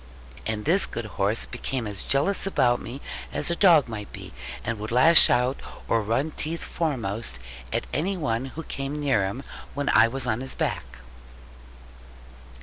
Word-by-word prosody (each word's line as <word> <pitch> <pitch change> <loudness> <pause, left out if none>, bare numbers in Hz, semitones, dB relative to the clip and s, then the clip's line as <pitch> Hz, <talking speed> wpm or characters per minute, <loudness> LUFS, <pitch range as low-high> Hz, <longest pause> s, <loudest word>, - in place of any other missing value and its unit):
And 110 -1 -2
this 180 +6 +3
good 115 -1 -5
horse 105 +1 0
became 125 0 -4
as 100 -2 -5
jealous 190 +9 +2
about 120 -10 +2
me 135 +4 -7 0.3
as 170 - -2
a - - +1
dog 170 -8 +6
might 105 -3 -6
be; - - -10 0.3
and 115 -2 -3
would 110 +2 -5
lash 135 +8 +8
out, 125 +2 +2 0.3
or 115 - +2
run 115 +9 0
teeth 160 +2 -3
foremost, 115 - -2 0.3
at - - -1
any 185 +5 0
one 120 -6 -1
who 155 +5 -7
came 140 0 -4
near 135 -9 +2
him 120 +8 -5 0.3
when 145 -1 -1
I 110 - +6
was 130 +2 -3
on 120 0 -1
his 135 - -3
back. - - -3
125 Hz, 165 wpm, -25 LUFS, 110-150 Hz, 0.3 s, lash